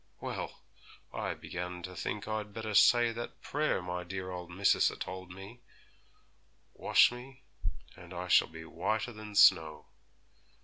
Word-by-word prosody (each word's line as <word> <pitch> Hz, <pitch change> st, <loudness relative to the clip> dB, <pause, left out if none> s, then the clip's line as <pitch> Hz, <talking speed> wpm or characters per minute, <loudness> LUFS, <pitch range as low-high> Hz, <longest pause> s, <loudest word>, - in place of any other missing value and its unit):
Well, -, -, -5 dB, 0.5 s
I -, -, -2 dB
began 90 Hz, 0 st, -6 dB
to 90 Hz, +1 st, -7 dB
think 105 Hz, +3 st, -4 dB
I'd 105 Hz, -2 st, -4 dB
better 110 Hz, -1 st, -4 dB
say 120 Hz, +3 st, +6 dB
that 120 Hz, +1 st, -7 dB
prayer 150 Hz, -9 st, 0 dB
my 90 Hz, 0 st, -4 dB
dear 95 Hz, +1 st, -5 dB
old 90 Hz, -1 st, -6 dB
missis 95 Hz, +3 st, +3 dB
a -, -, -7 dB
told 95 Hz, 0 st, -6 dB
me, 95 Hz, +6 st, -10 dB, 1.1 s
"Wash -, -, +5 dB
me, 130 Hz, +2 st, -11 dB, 0.5 s
and 90 Hz, 0 st, -13 dB
I 90 Hz, 0 st, -5 dB
shall -, -, +5 dB
be 80 Hz, 0 st, -10 dB
whiter 110 Hz, +9 st, -2 dB
than 105 Hz, -1 st, -9 dB
snow." 80 Hz, -7 st, +5 dB
95 Hz, 145 wpm, -32 LUFS, 90-110 Hz, 1.1 s, say